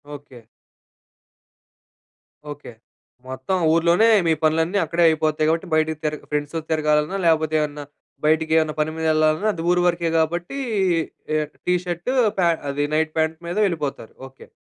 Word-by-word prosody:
Okay. 135 -4 -13 2.1
Okay. 145 -3 -10 0.6
మొత్తం 130 +8 -3 0.2
ఊర్లోనే 170 +6 +3 0.2
మీ 165 - +4
పనులన్నీ 160 +5 +1
అక్కడే 170 +2 0
అయిపోతాయి 155 -1 0
గాబట్టి 165 +3 -1
బయటికి 155 0 +1
తిరగ 150 -1 -2
ఫ్రెండ్స్‌తో 150 +2 -2
తిరగాలన్నా 150 +3 +1
లేకపోతే, 160 -1 +2
ఏవన్నా 150 -1 -4 0.4
బయటికి 160 +1 +2
ఏమన్నా 155 -1 +1
పని 155 - -1
మీద 160 - -3
వెళ్ళాలన్నా 155 +6 +2
అది 165 -3 -6
ఊరు 180 0 +2
వరకే 170 -1 0
గాబట్టి 175 - -1 0.8
ఆహ్, 150 - -1 0.2
టీషర్ట్ 180 +4 -1 0.3
పే 175 - +3 0.2
అది 145 +1 -1
నైట్ 160 0 +1
ప్యాంట్ 160 0 0
మీద 175 +3 -4
వెళ్ళిపోతారు. 150 - -4 0.2
ఓకే. 135 - -17
160 Hz, 135 wpm, -22 LUFS, 150-170 Hz, 2.1 s, మీ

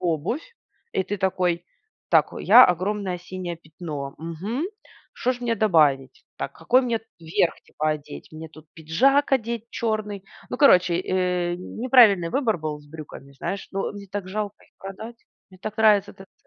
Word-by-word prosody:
обувь. 180 - -2 0.4
И - - +1
ты 205 - -3
такой: 180 -3 0 0.5
"Так, - - +4
о, - - -7
я- - - +8
огромное 185 +1 -1
синее 180 -1 -6
пятно, 155 -4 -7
мгм. 180 - -4 0.5
Что 255 - 0
ж 245 - -10
мне 235 -2 0
добавить? 150 -10 +2
Так, 140 - -4
какой 240 - +3
мне 235 -3 -1 0.2
верх, 165 +1 0
типа, 155 0 -2
одеть? 145 - -6
Мне 160 +1 -8
тут 155 0 -16
пиджак 265 - +2
одеть 235 -2 0
черный" 210 -3 -3 0.3
Ну, - - -3
короче, 180 - +5
э, 180 -2 0
неправильный 210 -4 +4
выбор 240 -8 +1
был 155 -1 -4
с 145 - -19
брюками, 145 -2 -11
знаешь. 195 +8 -5
Но 195 +1 -2
мне 200 -1 -9
так 200 -2 -4
жалко 205 0 -4
их - - -30
продать. 220 +5 -8 0.3
Мне 185 - -17
так 215 0 -6
нравится 210 -2 +4
этот 195 0 -15
ц - - -39
185 Hz, 170 wpm, -24 LUFS, 165-215 Hz, 0.5 s, я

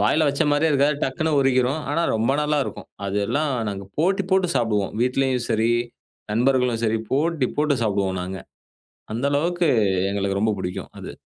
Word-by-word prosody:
வாயில 150 +10 +3
வச்ச 140 +3 +1
மாரியே 145 +2 +2
இருக்காது, 140 0 +2
டக்குனு 155 +4 -1
உருகிரும். 135 +2 +2
ஆனா 165 +3 +1
ரொம்ப 115 +4 +1
நல்லா 150 0 +1
இருக்கும். - - -8 0.2
அது 100 0 -2
எல்லாம் 150 +4 0 0.2
நாங்க 100 -1 -5
போட்டி 190 +5 +2
போட்டு 190 -1 +3
சாப்புடுவோம், 105 -4 0
வீட்லயும் 130 -1 0
சரி, 115 +1 +2 0.6
நண்பர்களும் 125 0 +2
சரி, 110 0 +1
போட்டி 150 -1 +1
போட்டு 150 -2 +2
சாப்புடுவோம் 100 -3 0
நாங்க. 95 +1 -5 0.7
அந்த 120 +5 -1
அளவுக்கு 170 +3 +1 0.4
எங்களுக்கு 100 0 -1
ரொம்ப 110 -1 +2
புடிக்கும் 90 -1 -5
அது. - - -7
130 Hz, 160 wpm, -23 LUFS, 110-150 Hz, 0.7 s, வாயில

